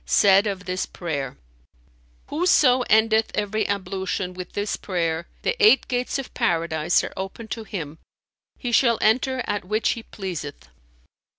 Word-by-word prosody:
said 200 +1 +4
of 195 -2 -4
this 185 0 -2
prayer, 140 -7 -4 0.9
'Whoso 290 -5 +4
endeth 220 0 +4
every 210 +1 -1
ablution 190 -1 -2
with 180 0 -8
this 205 0 -1
prayer, 170 -3 -2 0.2
the 465 - +1
eight 420 -11 +6
gates 250 +1 -1
of 270 - -7
Paradise 170 -7 +1
are - - -6
open 195 +4 -6
to 225 - -4
him; 160 -7 -6 0.6
he 245 - -4
shall 235 -1 +4
enter 255 +3 +2
at 205 - -2
which 215 +4 0
he 230 - -1
pleaseth.'" 175 - -7
200 Hz, 140 wpm, -23 LUFS, 180-230 Hz, 0.9 s, eight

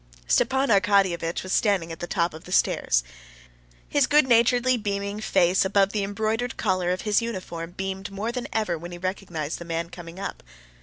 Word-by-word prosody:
Stepan 265 - +2
Arkadyevitch 195 -5 +2
was 185 - -3
standing 195 -6 +2
at 165 - -7
the 175 - -4
top 170 -3 0
of 155 - -11
the 180 - -10
stairs. - - +2 0.8
His 285 -2 +2
good 295 -2 +4
naturedly 245 +1 +4
beaming 200 -2 -3
face 180 -3 +3
above 195 0 +2
the 210 -2 -1
embroidered 220 +4 -2
collar 185 -4 0
of 180 0 -1
his 210 +1 +2
uniform 180 -6 -5
beamed 190 +1 -4
more 200 +4 -3
than 245 0 -4
ever 185 -7 -1
when 175 +2 -8
he 175 - -7
recognized 175 -4 -4
the - - -6
man 170 0 -3
coming 175 0 -10
up. 195 - -5
195 Hz, 185 wpm, -25 LUFS, 175-220 Hz, 0.8 s, good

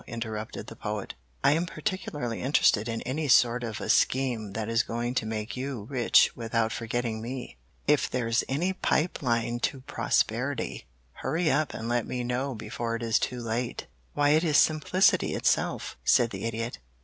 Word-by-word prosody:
interrupted 110 -2 -5
the - - -10
Poet. - - -4 0.3
"I - - +6
am 165 +4 +1
particularly 150 - -3
interested 120 -5 +3
in 115 0 -3
any 150 +4 -2
sort 120 -1 +4
of 110 -3 -4
a - - -5
scheme 120 -6 +1
that 110 0 -3
is 115 0 +3
going 120 +1 -3
to 110 -4 -1
make 110 0 -4
you 130 -4 -4
rich 125 -4 +4
without 115 -1 0
forgetting 115 -1 -2
me. 120 - -6 0.3
If 150 -1 +3
there's 115 -2 0
any 170 +8 0
pipe 175 -2 0
line 120 -2 0
to 130 +2 -1
prosperity, 95 - -1 0.3
hurry 160 +4 0
up 150 +2 0
and 115 - -5
let 120 -1 0
me 125 -1 -3
know 125 +2 -2
before 115 +1 -4
it 115 - -4
is 115 -1 +2
too 125 -1 -3
late." 115 +2 -2 0.3
"Why, 145 0 +3
it 155 +3 +4
is 155 -4 +3
simplicity 160 +5 +3
itself," - - 0
said 115 -1 +4
the 95 +2 -5
Idiot. 115 - -3
120 Hz, 175 wpm, -28 LUFS, 115-140 Hz, 0.3 s, I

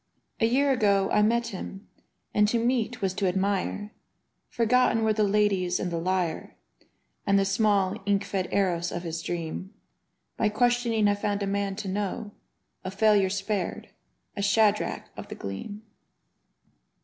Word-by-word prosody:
A 225 - +3
year 275 +4 +3
ago 200 -5 +2
I 210 - +4
met 230 +2 +2
him 195 +1 -8 0.3
— - - -49
^and 210 0 +5
to 235 - +1
meet 235 -1 0
was 190 -1 +1
to 195 0 0
admire: 195 +2 -1 0.6
Forgotten 235 -1 +2
were 220 0 +3
the 215 - 0
ladies 195 -3 +2
and 180 - -2
the 170 - -1
lyre, 180 -1 -2 0.7
And 200 0 +4
the 195 - +3
small, 195 -2 +2
ink 200 0 +2
fed 190 -2 -2
Eros 175 -3 +1
of 175 - -4
his 165 -1 -4
dream. 170 +3 -5 0.6
By 215 - +2
questioning 235 -1 +2
I 205 - +4
found 205 0 -2
a - - 0
man 200 0 -1
to 195 - -6
know 205 +2 -3 0.3
— - - -49
A 185 - -3
failure 200 0 +3
spared, 195 0 -3 0.5
a 200 - -3
Shadrach 210 +1 +2
of - - -8
the - - -7
Gleam. 150 - -7
200 Hz, 160 wpm, -27 LUFS, 190-215 Hz, 0.7 s, ^and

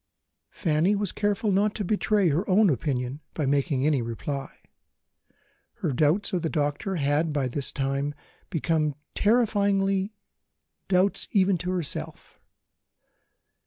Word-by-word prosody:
Fanny 165 +4 +1
was 205 -2 -1
careful 205 0 0
not 205 +2 +2
to 210 - -2
betray 205 -1 +2
her 170 +8 -1
own 195 0 +5
opinion 130 +1 -2
by 155 - -1
making 140 0 +1
any 150 -4 +2
reply; 135 +4 -4 1.2
her 140 - -2
doubts 155 - +2
of 180 - +1
the 160 - -1
doctor 150 +5 -1
had, 150 +1 +1
by 145 -3 0
this 130 +2 -3
time, 140 +1 -2 0.3
become 155 -2 0 0.2
terrifying 200 -3 +2 0.8
doubts 190 +1 +2
even 195 -1 +4
to 180 - -3
herself. 180 -5 -4
165 Hz, 125 wpm, -26 LUFS, 145-200 Hz, 1.2 s, own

